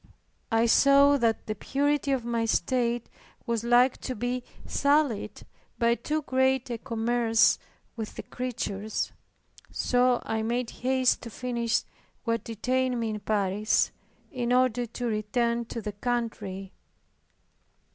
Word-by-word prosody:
I 225 +1 +3
saw 280 +4 +6
that 230 -4 +1
the 215 - -2
purity 280 +6 0
of 260 -3 0
my 235 -1 0
state 235 +3 0 0.4
was 230 -2 -1
like 245 +2 +4
to 255 - -4
be 245 +3 -2 0.2
sullied 280 -6 +1 0.3
by 235 -1 +3
too 300 +6 -2
great 260 -1 +1
a 235 - -3
commerce 230 -1 +2 0.4
with 220 -2 -6
the - - -6
creatures, 220 -4 -3 0.6
so 250 0 +2
I 220 0 -1
made 235 +2 -1
haste 260 0 +1
to 235 - -7
finish 235 0 -1 0.4
what 230 -2 -1
detained 250 +3 -1
me 225 -1 -1
in 210 - -4
Paris, 205 0 +1 0.4
in 245 -2 -2
order 250 -1 +2
to 245 +2 -5
return 235 +2 0
to 230 0 -6
the 210 - -3
country. 205 -4 -3
235 Hz, 130 wpm, -27 LUFS, 225-255 Hz, 0.6 s, saw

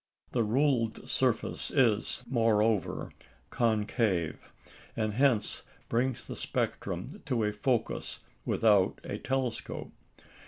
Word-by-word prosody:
The 120 - +1
ruled 115 0 +1
surface - - 0
is, 115 -5 +2
moreover, 110 -5 +1 0.4
concave, 105 -6 +1 0.6
and 110 -2 0
hence 125 -2 +2 0.3
brings 125 +1 0
the - - -6
spectrum - - -3
to 115 -3 +1
a 105 0 0
focus 115 +2 -1 0.3
without 105 -4 +3
a - - -4
telescope. 130 -3 -2
115 Hz, 95 wpm, -30 LUFS, 105-125 Hz, 0.6 s, without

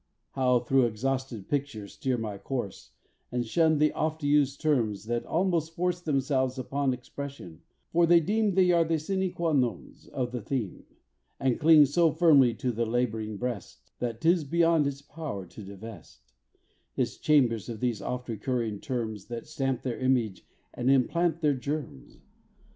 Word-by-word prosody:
How 125 -2 +2
through 130 0 +3
exhausted 125 -1 -3
pictures 135 -8 -3
steer 130 -2 -1
my 105 -3 -5
course, 100 - -5 0.4
And 125 -1 -1
shun 160 +5 +3
the 150 +1 +3
oft 155 0 -2
used 145 -1 +2
terms 115 -10 0
that 120 +1 -2
almost 165 -2 0
force 175 0 -1
Themselves 135 -4 0
upon 135 +1 -1
expression, 125 - -8 0.3
for 170 0 +4
they 170 0 +7
deem 205 +3 +1
They 185 -2 +5
are 170 -1 +4
the 165 0 0
sine 190 +4 -1
qua 170 -2 -1
nons 125 -4 -2
of 125 -2 -3
the 125 -1 -4
theme, 110 -3 -4 0.5
And 130 -3 +1
cling 155 -1 +7
so 165 +4 +3
firmly 145 -6 +5
in 125 +2 -1
the 115 - 0
lab'ring 110 -3 -1
breast, 120 -4 -6
That 115 -2 -3
'tis 170 0 +3
beyond 165 0 +3
its 140 0 -5
power 145 - -6
to 100 - -12
divest 95 - -12 0.6
Its - - 0
chambers 125 -8 +2
of 115 -2 -5
these 120 -4 -1
oft 125 0 -4
recurring 115 -1 -2
terms, 115 -7 -4
That 120 -1 -6
stamp 135 -5 -2
their 125 -3 -3
image 125 -7 0 0.3
and 125 +2 -1
implant 165 +5 +2
their 150 -2 +3
germs. 140 - -5
130 Hz, 160 wpm, -28 LUFS, 115-155 Hz, 0.6 s, they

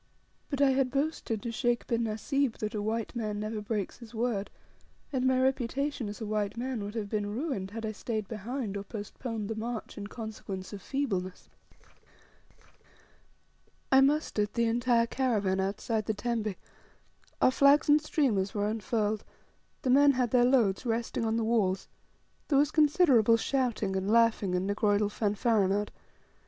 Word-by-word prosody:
But 280 -2 -2
I 275 - +5
had 265 -1 +2
boasted 275 -6 -2
to 235 - -3
Sheikh 240 0 0
bin 235 -1 0
Nasib 230 +4 -1
that 215 0 -3
a 210 - -2
white 225 +3 -2
man 215 -3 -2
never 215 0 -3
breaks 210 0 -3
his 235 -1 -12
word, 220 -3 -1 0.6
and 260 -1 +1
my 260 0 +3
reputation 265 -1 0
as 205 - -7
a 220 - -4
white 210 0 -2
man 245 -3 -3
would 205 +2 -6
have 215 -3 -2
been 205 0 -2
ruined 245 - -3
had 225 +2 -5
I 215 - -2
stayed 215 -1 -4
behind, 220 +1 -4
or 200 - -3
postponed 215 +1 -5
the 225 - -2
march, 225 0 -5
in 205 - -5
consequence 210 -4 -7
of 200 - -7
feebleness. 195 -10 -3 2.4
I 265 0 +7
mustered 270 -7 +1
the 235 - +2
entire 235 0 +2
caravan 215 -7 0
outside 210 +3 -1
the 220 - 0
tembe, 215 -2 -2 0.8
our - - +5
flags 280 +2 +5
and 300 +1 +5
streamers 230 -11 0
were 205 0 0
unfurled, 215 -1 -1 0.6
the 255 - +2
men 285 +2 +6
had 250 -3 0
their 245 -1 +5
loads 240 -7 +3
resting 230 -1 -1
on 225 0 0
the 230 - 0
walls, 210 -5 +1 0.6
there 280 - +3
was 290 +2 +3
considerable 285 - +5
shouting, 235 -6 -1
and 190 +1 -1
laughing, 225 -4 +3
and 180 +1 0
negroidal 205 0 +1
fanfaronnade. 205 -1 +1
225 Hz, 160 wpm, -29 LUFS, 205-255 Hz, 2.4 s, I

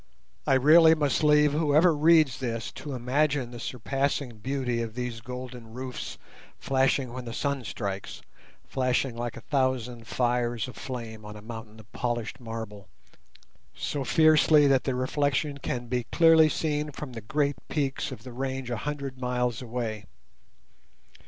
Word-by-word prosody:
I 135 - +5
really 160 +4 +7
must 145 -3 0
leave 150 -1 +5
whoever 155 +2 +4
reads 155 -3 +4
this 115 -3 -3
to 145 -3 -6
imagine 130 +1 0
the 120 - -8
surpassing 135 0 -2
beauty 125 0 -1
of 115 -1 -5
these 125 -2 -4
golden 125 -2 -8
roofs 130 0 -6 0.4
flashing 135 -1 +1
when 130 -1 -6
the 115 - -6
sun 140 -2 -1
strikes—flashing 120 +5 -4
like 120 -1 -4
a - - -8
thousand 125 -4 -1
fires 120 -2 0
aflame 115 -4 -7
on 105 0 -9
a 105 - -10
mountain 110 -1 -9
of 110 -1 -16
polished 120 -2 -3
marble—so 115 +4 -8
fiercely 155 +1 +5
that 135 -2 +3
the 130 - 0
reflection 140 +2 0
can 125 -2 -3
be 125 0 -2
clearly 165 -2 +6
seen 150 -1 -1
from 140 -2 -7
the 115 - -6
great 145 +4 0
peaks 140 -3 -1
of 110 - -8
the 125 -1 -9
range 130 0 -3
a 120 - -1
hundred 140 +1 -5
miles 125 -2 -1
away. 115 -4 -4
125 Hz, 145 wpm, -27 LUFS, 120-145 Hz, 0.4 s, really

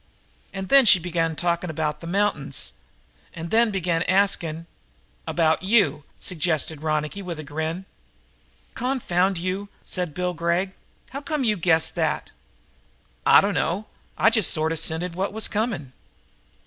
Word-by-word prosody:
And 190 -1 -6
then 275 -3 +6
she 195 - +9
begun 165 -2 -1
talking 170 +1 -1
about 150 -1 -2
the 165 - -8
mountains, 170 -7 0 0.6
and 165 0 -6
then 230 +1 +5
she 215 - -4
begun 175 -3 0
asking 180 -4 +1 0.6
"About 160 -2 +2
you!" 190 -8 +2
suggested 160 -3 -2
Ronicky 155 +4 -1
with 175 -4 -5
a 155 - -6
grin. 160 +5 -4 0.9
"Confound 195 -8 0
you," 185 +3 -3
said 180 -5 -4
Bill 180 0 -1
Gregg. 170 +3 0 0.4
"How 275 +2 -5
come 295 -1 -2
you 215 -3 +2
guessed 165 -3 +2
that?" - - -1 1.0
"I - - +8
dunno. 195 0 -1 0.3
I 225 - +5
just 220 -4 +4
sort 155 0 +2
of 165 - -1
scented 165 +2 -1
what 190 +3 -2
was 220 0 -2
coming." 200 - -2
175 Hz, 145 wpm, -24 LUFS, 160-200 Hz, 1.0 s, she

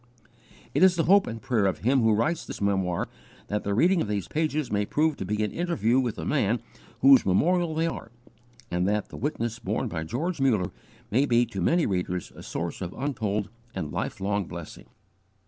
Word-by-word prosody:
It - - +1
is 185 -1 +6
the 165 - +1
hope 200 +3 +5
and 115 - -4
the - - -23
prayer 110 -6 +2
of 95 - 0
him 130 +4 +3
who 110 -1 +4
writes 160 +10 0
this - - -7
memoir 95 -3 0 0.4
that 105 0 -1
the 100 0 -1
reading 175 - +4
of - - -1
these 100 -3 -2
pages 155 -3 -1
may 105 0 +1
prove 155 +8 +1
to - - -4
be 105 +3 -1
an 105 - -1
interview 165 -9 +1
with 120 -4 -1
the - - -6
man 120 -5 +1 0.4
whose 135 -1 +8
memorial 165 - +2
they 165 +1 +1
are, 165 -8 -4 0.6
and 90 +1 +1
that 105 0 0
the - - -10
witness 120 -4 -2
borne - - -2
by 80 - -3
George 140 - -3
Muller 110 -9 +2 0.4
may 135 +7 +3
be 120 0 +4
to 95 -5 -5
many 165 - +3
readers 90 -2 -2
a - - -10
source 85 +1 -4
of 90 -1 -4
untold 110 -7 -2 0.3
and 80 -6 -3
lifelong 100 +5 -2
blessing. 85 -2 -9
115 Hz, 200 wpm, -27 LUFS, 100-150 Hz, 0.6 s, whose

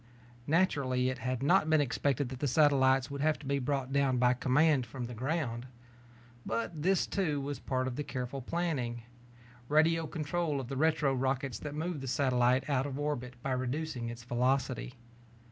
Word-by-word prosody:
Naturally, 140 -7 +2
it 130 - -6
had 130 0 -2
not 155 +2 +4
been 155 -1 +5
expected 140 -1 0
that 130 -1 -7
the 145 - 0
satellites 135 -1 +4
would 140 0 -4
have 155 +1 +2
to 145 - -13
be 140 +1 0
brought 135 0 -2
down 140 -2 +2
by 125 0 +4
command 135 +3 +3
from 120 +2 -6
the 120 - -7
ground. 130 -1 -2 0.8
But 130 +9 -3
this, 190 +3 +2
too, 160 -8 -1
was 140 0 -4
part 130 -1 -1
of 130 - -3
the 150 - -1
careful 130 -1 -4
planning 130 -6 -2 0.7
radio 160 +2 +3
control 155 -1 -2
of 130 -2 -6
the 135 - -3
retro 155 -1 +2
rockets 135 -2 -1
that 145 -1 -6
move 160 -1 -3
the 135 - -5
satellite 125 -1 +2
out 140 -2 +1
of 135 -1 -5
orbit 145 -4 -3
by 135 - -1
reducing 130 -1 -2
its 120 0 -8
velocity. 125 +1 0
135 Hz, 180 wpm, -31 LUFS, 125-150 Hz, 0.8 s, been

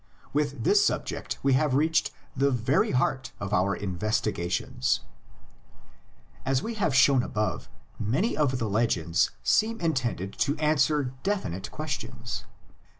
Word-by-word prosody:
With 145 -1 -1
this 410 +1 +5
subject - - -2
we 135 -1 +4
have 130 0 +2
reached 160 +3 +2 0.3
the 140 +1 +3
very 125 +1 +2
heart 130 0 0
of 100 0 -4
our 100 +1 +2
investigations. 95 - -1 1.4
As 135 0 +1
has 230 0 -4
been 180 - +2
shown 135 0 +5
above, 105 -2 -2 0.3
many 135 - 0
of 140 -4 +1
the 115 -3 -1
legends 90 -6 +1
seem 225 +1 +2
intended 120 - -1
to 145 +2 +1
answer 150 -3 +2
definite 145 - -2
questions. 125 -6 -5
130 Hz, 125 wpm, -27 LUFS, 105-150 Hz, 1.4 s, this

